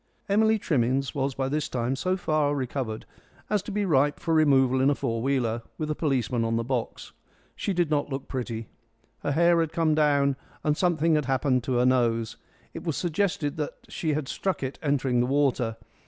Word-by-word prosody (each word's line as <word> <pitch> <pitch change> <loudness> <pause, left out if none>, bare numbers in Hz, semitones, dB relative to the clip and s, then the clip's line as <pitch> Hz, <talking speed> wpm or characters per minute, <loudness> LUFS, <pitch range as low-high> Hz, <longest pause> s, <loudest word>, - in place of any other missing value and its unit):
Emily 220 +2 +3
Trimmins 135 - 0
was 135 -1 -1
by 135 -1 -1
this 150 +2 -1
time 125 +1 -1
so 185 +7 -1
far 155 -4 +1
recovered 125 -4 -3 0.5
as 210 -2 +2
to 205 - -7
be 205 0 0
ripe 145 -4 +2
for 165 - -1
removal 135 -4 +4
in 135 - +4
a 145 - +2
four 115 -5 -2
wheeler, 120 -3 0 0.2
with 155 -1 -2
a - - +2
policeman 125 -6 0
on 115 0 0
the 115 - 0
box. 125 -1 -3 0.4
She - - -2
did 175 -4 0
not 145 -1 +1
look 135 -1 -5
pretty. 115 -4 -4 0.5
Her 145 - -1
hair 170 +2 +4
had 165 -2 0
come 160 -2 +2
down, 140 -3 +3 0.3
and 150 -1 +2
something 165 -2 +2
had 150 -2 +2
happened 130 -1 +1
to 130 - -1
her 125 0 +3
nose. 115 -3 +1 0.4
It - - -7
was 165 -5 -2
suggested 170 -3 -1
that 150 -2 -3
she 155 -2 -1
had 145 -2 -2
struck 190 -1 -2
it 130 +1 -4
in 155 - -4
entering 130 -3 +1
the 120 - +2
water. 130 -5 +1
140 Hz, 200 wpm, -26 LUFS, 125-155 Hz, 0.5 s, removal